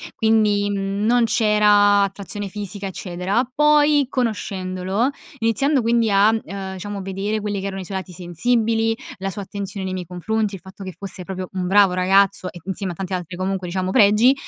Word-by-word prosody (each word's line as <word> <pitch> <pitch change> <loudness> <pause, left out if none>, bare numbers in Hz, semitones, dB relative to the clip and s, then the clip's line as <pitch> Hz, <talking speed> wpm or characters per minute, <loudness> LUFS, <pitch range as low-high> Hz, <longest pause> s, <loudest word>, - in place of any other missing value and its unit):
Quindi, 210 -2 +2
mhmm, 200 +1 -2
non 240 +1 +4
c'era 210 -2 +4
attrazione 200 +1 -5
fisica 200 0 -5
eccetera, 190 +6 -2
poi 300 0 +4
conoscendolo, 195 -3 -1 0.3
iniziando 255 +5 +2
quindi 230 -1 +2
a, 200 +2 +5
uhm, 195 -3 -3
diciamo 200 +1 -6
vedere 195 +3 -2
quelli 205 -1 -2
che 195 - -3
erano 195 -1 -5
i - - -8
suoi 190 +1 -4
lati 190 -1 -7
sensibili, 225 +6 0 0.2
la 195 0 -3
sua 200 - -6
attenzione 200 0 -5
nei 185 - -3
miei 180 -1 -5
confronti, 200 +4 -2
il 185 - -11
fatto 190 +1 -11
che 185 -1 -7
fosse 195 -2 -7
proprio 185 0 -5
un 185 -1 -2
bravo 195 -1 +5
ragazzo 185 0 +2
e 175 - -11
insieme 190 0 -3
a - - -8
tanti 190 +1 -5
altri 180 -1 -4
comunque 190 0 -2
diciamo 185 +1 -2
pregi, 215 +3 +5
200 Hz, 180 wpm, -21 LUFS, 190-220 Hz, 0.3 s, a